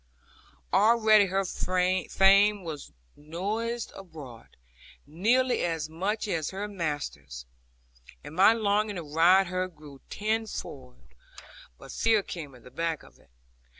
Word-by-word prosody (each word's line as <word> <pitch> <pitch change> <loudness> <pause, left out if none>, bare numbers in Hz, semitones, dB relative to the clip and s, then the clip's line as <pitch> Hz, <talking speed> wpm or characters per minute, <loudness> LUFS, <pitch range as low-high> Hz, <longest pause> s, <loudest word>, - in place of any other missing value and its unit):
Already 215 0 +5
her 195 +1 0
fame 190 +3 +2
was 155 -4 -7 0.2
noised 210 +10 -4
abroad, 155 -11 -12 0.5
nearly 235 - +1
as 165 -3 -2
much 205 +7 -2
as 165 -6 -2
her 200 +2 -5
master's; 145 - -5 0.8
and - - -10
my 190 +4 +7
longing 210 -1 0
to 175 - -5
ride 170 +6 +4
her 185 +1 -2
grew 150 -5 -15
tenfold, 200 - -5 0.6
but - - -12
fear 225 -3 +2
came 150 -8 -8
at 120 - -17
the 125 - -14
back 165 -2 -3
of - - -19
it. - - -26
185 Hz, 120 wpm, -27 LUFS, 155-210 Hz, 0.8 s, my